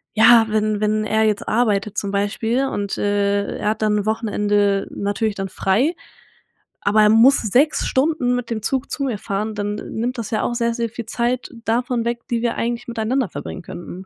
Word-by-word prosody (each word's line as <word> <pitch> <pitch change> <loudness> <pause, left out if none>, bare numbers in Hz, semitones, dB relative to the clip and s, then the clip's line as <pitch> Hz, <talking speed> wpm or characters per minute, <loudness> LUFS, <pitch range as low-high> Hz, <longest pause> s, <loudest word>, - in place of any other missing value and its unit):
ja, 225 +1 +7
wenn 215 -1 0
wenn 215 0 +1
er 220 +1 +2
jetzt 210 -1 0
arbeitet, 215 -3 +1
zum 200 - -1
Beispiel, 225 +6 0
und, 200 -5 -3
äh, 200 0 0
er 210 - 0
hat 220 - -5
dann 210 -1 +2
'n 200 - -3
Wochenende 205 -2 +1
natürlich 205 +1 -2
dann 195 -1 -4
frei, 210 - +1 0.9
aber 210 +1 +3
er 210 - +5
muss 230 +6 +6
6 250 +8 +2
Stunden 260 -3 +1
mit 245 -1 -4
dem 220 -1 -2
Zug 265 +2 -1
zu 280 - -2
mir 245 -6 -2
fahren, 210 +1 -3
dann 205 0 -2
nimmt 235 +4 -4
das 220 -3 -5
ja 215 - 0
auch - - -1
sehr, 235 -1 0
sehr 235 -1 -1
viel 230 0 -7
Zeit 240 +2 -2
davon 240 +1 0
weg, 235 0 -2
die 235 -1 0
wir 235 0 0
eigentlich 235 +1 -3
miteinander 235 +2 -1
verbringen 185 - -7
könnten. 175 +3 -9
220 Hz, 195 wpm, -21 LUFS, 205-240 Hz, 0.9 s, ja